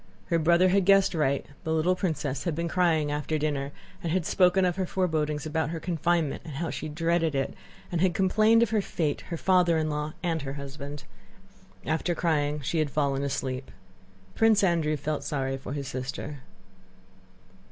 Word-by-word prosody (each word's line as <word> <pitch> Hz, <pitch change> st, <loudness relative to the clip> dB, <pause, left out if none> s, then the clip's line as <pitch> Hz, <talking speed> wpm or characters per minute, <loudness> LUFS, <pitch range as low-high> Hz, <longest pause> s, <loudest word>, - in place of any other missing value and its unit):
Her 170 Hz, -2 st, +2 dB
brother 170 Hz, +3 st, +4 dB
had 195 Hz, 0 st, +3 dB
guessed 195 Hz, 0 st, +5 dB
right: 140 Hz, -4 st, +1 dB, 0.2 s
the 160 Hz, -, -2 dB
little 160 Hz, +3 st, +2 dB
princess 160 Hz, -7 st, -2 dB
had 170 Hz, -4 st, 0 dB
been 170 Hz, +1 st, -2 dB
crying 165 Hz, -4 st, +2 dB
after 150 Hz, +1 st, -1 dB
dinner 145 Hz, -2 st, -1 dB, 0.3 s
and 165 Hz, -, -2 dB
had 180 Hz, -1 st, 0 dB
spoken 185 Hz, 0 st, +4 dB
of 175 Hz, -1 st, +1 dB
her 190 Hz, -1 st, -2 dB
forebodings 155 Hz, -5 st, -1 dB
about 155 Hz, -1 st, -1 dB
her 165 Hz, 0 st, -4 dB
confinement, 170 Hz, -3 st, 0 dB
and 150 Hz, -, -8 dB
how 165 Hz, +3 st, -2 dB
she 155 Hz, -, -5 dB
dreaded 165 Hz, 0 st, 0 dB
it, 135 Hz, 0 st, -1 dB, 0.4 s
and 170 Hz, -2 st, 0 dB
had 185 Hz, -2 st, +2 dB
complained 215 Hz, +4 st, +4 dB
of 235 Hz, -, -1 dB
her 215 Hz, -2 st, +2 dB
fate, 155 Hz, -6 st, -2 dB
her 170 Hz, -, -3 dB
father 180 Hz, -2 st, +3 dB
in 155 Hz, -1 st, 0 dB
law, 150 Hz, +1 st, -3 dB
and 165 Hz, -2 st, 0 dB
her 135 Hz, 0 st, -5 dB
husband. 140 Hz, +1 st, -7 dB, 0.8 s
After 165 Hz, +2 st, 0 dB
crying 150 Hz, -3 st, 0 dB
she 160 Hz, +4 st, -1 dB
had 155 Hz, -2 st, +1 dB
fallen 140 Hz, -1 st, 0 dB
asleep. 135 Hz, -2 st, -3 dB, 0.6 s
Prince 225 Hz, -2 st, +4 dB
Andrew 165 Hz, -4 st, +2 dB
felt 145 Hz, 0 st, -3 dB
sorry 135 Hz, -2 st, -2 dB
for 135 Hz, 0 st, -6 dB
his 140 Hz, -2 st, -4 dB
sister. 135 Hz, +3 st, -5 dB
160 Hz, 180 wpm, -27 LUFS, 145-175 Hz, 0.8 s, guessed